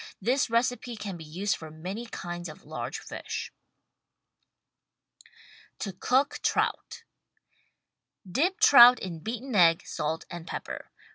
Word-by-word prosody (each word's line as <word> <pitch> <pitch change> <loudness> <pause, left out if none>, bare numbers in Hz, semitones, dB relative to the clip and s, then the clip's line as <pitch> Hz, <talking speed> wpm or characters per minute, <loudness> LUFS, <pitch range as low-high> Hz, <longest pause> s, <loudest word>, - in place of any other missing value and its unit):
This 250 +6 +1
recipe 240 +1 0
can 205 -3 -6
be 165 - -9
used 180 +6 -2
for 160 - -9
many 185 +9 -6
kinds 175 -5 -6
of 155 - -12
large - - -5
fish. - - -6 2.2
TO 195 - -5
COOK 260 +9 +1
TROUT - - -1 1.2
Dip 320 - 0
trout 250 -2 +9
in 175 -4 -6
beaten 240 +7 -5
egg, 170 -4 +5
salt 160 +2 -3
and 175 0 -8
pepper. - - -6
200 Hz, 120 wpm, -28 LUFS, 170-245 Hz, 2.2 s, trout